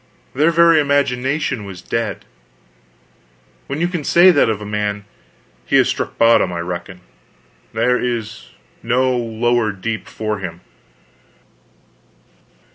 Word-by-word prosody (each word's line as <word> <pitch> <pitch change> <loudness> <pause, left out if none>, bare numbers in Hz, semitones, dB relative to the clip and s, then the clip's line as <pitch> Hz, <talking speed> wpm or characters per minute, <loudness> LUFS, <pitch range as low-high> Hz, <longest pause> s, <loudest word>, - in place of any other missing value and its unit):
Their 150 +5 +3
very 170 -1 +5
imagination 140 -3 0
was 95 -2 -10
dead. 115 -2 -3 1.4
When 140 - -4
you 175 - +1
can 175 -4 -4
say 175 +5 +6
that 145 -8 +3
of 110 -2 -1
a 105 - -8
man, 105 0 -3 0.6
he - - -1
has - - +4
struck - - -3
bottom, 115 -5 +4
I 85 - -4
reckon; 90 +1 -6 0.7
there 125 0 +1
is 115 -3 -4 0.3
no 125 +2 +1
lower 120 -1 0
deep 110 +3 -5
for 110 -1 -4
him. 90 -2 -7
115 Hz, 120 wpm, -18 LUFS, 105-140 Hz, 1.4 s, say